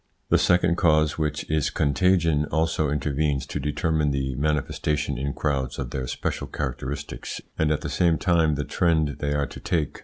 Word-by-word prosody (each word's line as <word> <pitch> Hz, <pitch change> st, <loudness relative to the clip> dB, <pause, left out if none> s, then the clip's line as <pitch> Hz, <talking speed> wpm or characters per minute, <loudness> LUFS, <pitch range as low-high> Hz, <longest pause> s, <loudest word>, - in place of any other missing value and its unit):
The -, -, +4 dB
second 90 Hz, -1 st, +3 dB
cause, 75 Hz, -2 st, +3 dB
which 75 Hz, -1 st, -2 dB
is 80 Hz, -2 st, +1 dB
contagion, 80 Hz, +1 st, +2 dB
also 80 Hz, 0 st, 0 dB
intervenes 75 Hz, -1 st, 0 dB
to -, -, -4 dB
determine 75 Hz, +1 st, 0 dB
the 65 Hz, -1 st, -1 dB
manifestation 75 Hz, +1 st, -1 dB
in 70 Hz, +1 st, -1 dB
crowds 65 Hz, -3 st, -1 dB
of 65 Hz, -3 st, -4 dB
their 65 Hz, -1 st, -3 dB
special -, -, -3 dB
characteristics, 70 Hz, +3 st, -5 dB, 0.2 s
and 80 Hz, -, +1 dB
at 75 Hz, -, 0 dB
the -, -, -3 dB
same 85 Hz, -2 st, +2 dB
time 80 Hz, -4 st, +2 dB
the 75 Hz, -, -2 dB
trend 80 Hz, -4 st, +1 dB
they 75 Hz, 0 st, -1 dB
are 70 Hz, -1 st, +1 dB
to -, -, -10 dB
take. 80 Hz, -5 st, -1 dB
75 Hz, 175 wpm, -25 LUFS, 70-80 Hz, 0.2 s, The